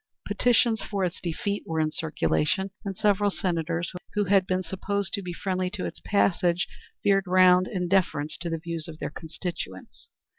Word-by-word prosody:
Petitions 235 -2 +3
for 200 -3 -1
its 175 0 -4
defeat 200 +4 -2
were 160 -1 -1
in 155 0 +1
circulation, 175 +4 0
and 195 -3 -4
several 205 -1 +3
Senators 170 -3 -1 0.2
who 210 - +3
had 195 -1 +3
been 185 0 0
supposed 190 +2 -2
to 200 - 0
be 180 -2 -5
friendly 185 +1 -1
to 195 0 -4
its - - -6
passage 180 -3 +2 0.4
veered 195 -1 +3
round 185 0 +6
in 180 -2 -2
deference 170 -5 +1
to 170 0 -4
the 165 - -1
views 165 -1 -4
of 160 -2 -8
their 150 - -4
constituents. 160 - -7
185 Hz, 175 wpm, -27 LUFS, 165-195 Hz, 0.4 s, round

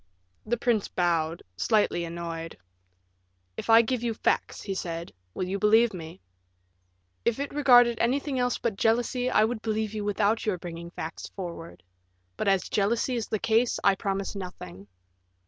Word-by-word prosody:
The 240 +2 +1
prince 230 -3 +1
bowed, 165 -2 0
slightly 205 - +1
annoyed. 165 -1 -6 1.0
"If - - -7
I 225 +1 +8
give 245 +1 -1
you 235 -2 -1
facts," - - -1
he 195 - -3
said, 170 -2 -5 0.2
"will 185 - -2
you 195 +2 -2
believe 220 +2 +4
me?" 165 0 -8 1.0
"If 235 +2 0
it 280 0 -3
regarded 245 -5 +5
anything 265 +2 0
else 245 0 +1
but 225 -4 -2
jealousy, 245 +3 +1
I 215 - +4
would 220 0 -1
believe 220 -1 -2
you 210 -1 -3
without 205 +2 +1
your 210 -4 0
bringing 170 0 -8
facts 165 -1 -7
forward; 170 -3 -7 0.5
but - - -3
as 195 -2 +2
jealousy 230 +5 +1
is 230 -2 -2
the 215 - -1
case, 225 +3 +2
I 200 - +5
promise 195 0 -3
nothing." 100 - -8
210 Hz, 160 wpm, -27 LUFS, 175-235 Hz, 1.0 s, I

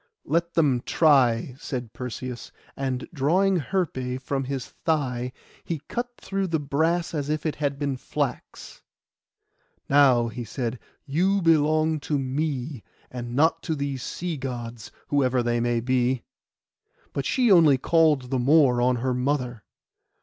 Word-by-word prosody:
'Let 170 +1 0
them 140 -7 +3
try,' 130 -6 +3
said 125 -7 -5
Perseus; 125 0 -6 0.2
and 130 -2 -3
drawing, 180 +6 +2
Herpé 130 -7 -2
from 135 0 -2
his 135 -1 -3
thigh, 130 -6 -2 0.3
he 165 -3 -3
cut 245 +1 -3
through 195 -1 -2
the 165 -2 0
brass 160 +5 0
as 145 -2 -2
if 155 0 -2
it 155 - -1
had 145 -2 -1
been 140 -2 -2
flax. - - -5 1.1
'Now,' 135 -4 +5
he 120 +1 -6
said, 120 +1 -4 0.3
'you 180 +8 +2
belong 155 0 +3
to 145 +1 -1
me, 135 -1 -2 0.3
and 120 -1 -6
not 160 +3 +3
to 160 -2 -2
these 140 -2 -3
sea 170 +4 -4
Gods, 120 -4 -6 0.2
whosoever 130 -3 +2
they 120 0 0
may 120 0 +1
be!' 125 0 +1 0.9
But 140 - -2
she 245 -4 +3
only 160 -7 +6
called 150 -3 +2
the 130 - +1
more 130 -2 +4
on 125 +1 +3
her 125 +2 -1
mother. 125 -3 -1
140 Hz, 140 wpm, -25 LUFS, 125-160 Hz, 1.1 s, only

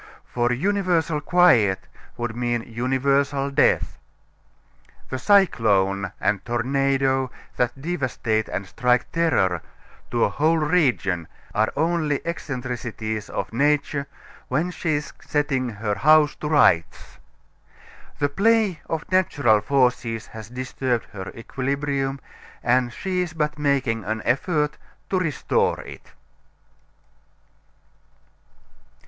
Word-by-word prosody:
For 120 0 0
universal 170 0 +1
quiet 130 - +4 0.4
would 120 -1 -3
mean 120 -1 -1
universal 135 +4 0
death. 140 - +2 1.1
The 130 - -2
cyclone 100 - +3
and 105 -1 0
tornado 135 +2 +1 0.3
that 120 +2 0
devastate 130 -8 -1
and 100 - -3
strike 125 +5 +1
terror 95 - +1 0.5
to 120 -1 +1
a - - +3
whole 155 +10 +2
region 130 - +1 0.3
are 110 +2 +1
only 160 -2 +1
eccentricities 125 -8 -4
of - - -4
nature 140 +2 +1 0.4
when 175 +3 0
she 165 -2 -2
is 145 0 -4
setting 135 -4 -1
her 105 -1 -3
house 150 +7 +5
to 150 - -4
rights. 85 - +2 1.0
The 145 - +2
play 205 0 +2
of 160 -1 -2
natural 145 - +3
forces 125 -2 +1
has 110 -2 -10
disturbed 130 -1 -2
her 95 -2 -7
equilibrium, 135 +3 -2 0.4
and 120 0 +2
she 185 +6 -2
is 175 -2 -3
but 150 -2 -2
making 135 -6 +1
an 110 +1 -3
effort 150 +4 0 0.3
to 190 - +2
restore 160 -7 0
it. - - -12
135 Hz, 105 wpm, -23 LUFS, 115-150 Hz, 1.1 s, house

